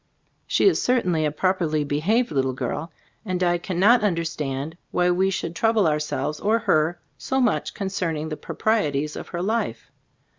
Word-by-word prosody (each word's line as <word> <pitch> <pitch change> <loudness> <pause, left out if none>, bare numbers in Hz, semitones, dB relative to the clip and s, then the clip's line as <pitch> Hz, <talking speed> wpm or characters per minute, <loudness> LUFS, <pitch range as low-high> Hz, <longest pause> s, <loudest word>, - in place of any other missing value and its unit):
She - - +2
is 385 - +3
certainly 180 -11 +1
a 150 - 0
properly 160 -2 0
be 145 0 -1
haved 220 +8 +1
little 135 -3 0
girl, 140 +6 -4 0.3
and 185 -4 -2
I 175 -1 +2
cannot 200 +7 +3
un 200 -5 +2
derstand 150 -3 -3 0.2
why 180 0 +2
we 190 +2 +2
should 170 -3 -3
trouble 225 -1 +2
our 150 -1 +2
selves 150 0 -3
or 215 +3 +2
her 165 -4 +1 0.2
so 265 - -1
much 250 - 0
concerning 170 -6 -2
the 155 - -3
proprieties 150 -9 -1
of - - -7
her 175 0 -4
life. 225 +4 -2
175 Hz, 175 wpm, -24 LUFS, 150-200 Hz, 0.3 s, is